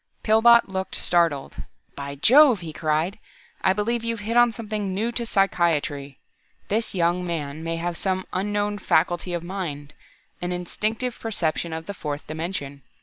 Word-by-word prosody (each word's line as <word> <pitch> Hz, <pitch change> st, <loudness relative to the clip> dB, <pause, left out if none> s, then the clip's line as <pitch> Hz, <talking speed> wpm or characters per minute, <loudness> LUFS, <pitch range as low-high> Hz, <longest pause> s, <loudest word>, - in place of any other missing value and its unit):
Pillbot 235 Hz, +2 st, +6 dB
looked 190 Hz, 0 st, -3 dB
startled. 165 Hz, -6 st, +1 dB, 0.4 s
"By 140 Hz, 0 st, -6 dB
jove," 250 Hz, -, +6 dB
he 160 Hz, -2 st, -7 dB
cried. 160 Hz, +6 st, -1 dB, 0.4 s
"I -, -, +5 dB
believe 225 Hz, +4 st, -1 dB
you've 230 Hz, -2 st, -2 dB
hit 225 Hz, +3 st, -3 dB
on 240 Hz, 0 st, +6 dB
something 210 Hz, -4 st, -4 dB
new 225 Hz, +4 st, 0 dB
to 235 Hz, -1 st, -3 dB
psychiatry. 155 Hz, -, +1 dB, 0.5 s
This 220 Hz, 0 st, -1 dB
young 175 Hz, 0 st, +1 dB
man 160 Hz, -3 st, -4 dB
may 165 Hz, 0 st, -2 dB
have 170 Hz, +1 st, -3 dB
some 190 Hz, +1 st, -1 dB
unknown 205 Hz, +2 st, -1 dB
faculty 175 Hz, 0 st, +1 dB
of 170 Hz, -1 st, -2 dB
mind 165 Hz, -6 st, -5 dB, 0.5 s
an 175 Hz, 0 st, -2 dB
instinctive 215 Hz, +7 st, -2 dB
perception 170 Hz, -6 st, -1 dB
of 160 Hz, 0 st, -5 dB
the 200 Hz, -, -5 dB
fourth 150 Hz, -5 st, -5 dB
dimension. 155 Hz, -3 st, -5 dB
180 Hz, 150 wpm, -24 LUFS, 160-215 Hz, 0.5 s, Pillbot